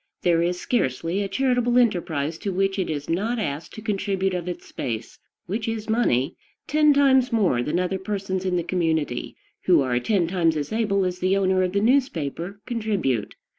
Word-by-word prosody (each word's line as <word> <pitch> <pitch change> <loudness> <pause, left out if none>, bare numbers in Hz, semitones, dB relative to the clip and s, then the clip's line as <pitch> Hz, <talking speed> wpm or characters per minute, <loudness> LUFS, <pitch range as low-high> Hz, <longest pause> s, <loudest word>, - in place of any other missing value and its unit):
There 170 -1 +3
is 175 +1 0
scarcely 170 - -1
a 200 - -1
charitable 245 +2 +1
enterprise 165 -9 +1
to 200 - -3
which 195 +1 0
it 185 - -1
is 145 -2 -3
not 210 +9 0
asked 150 -8 -4
to 220 - -9
contribute 195 -3 -1
of 180 -1 -3
its 180 - -5
space, 115 -3 -5 0.3
which 215 +6 -3
is 225 -1 -3
money, 155 - +1 0.3
ten 300 0 +4
times 265 -3 +4
more 195 - +2
than 150 +8 -1
other 185 +1 -1
persons 190 -1 -3
in 185 -1 0
the 175 - 0
community, 160 -7 -1 0.3
who 175 -5 +5
are 125 -2 +1
ten 185 - +1
times 165 -2 +1
as 150 +8 -3
able 205 -4 +1
as 180 0 -3
the 185 +2 +2
owner 190 -1 +2
of 185 0 0
the 200 - +2
newspaper, 200 - 0
contribute. 205 - -1
185 Hz, 185 wpm, -24 LUFS, 165-215 Hz, 0.3 s, who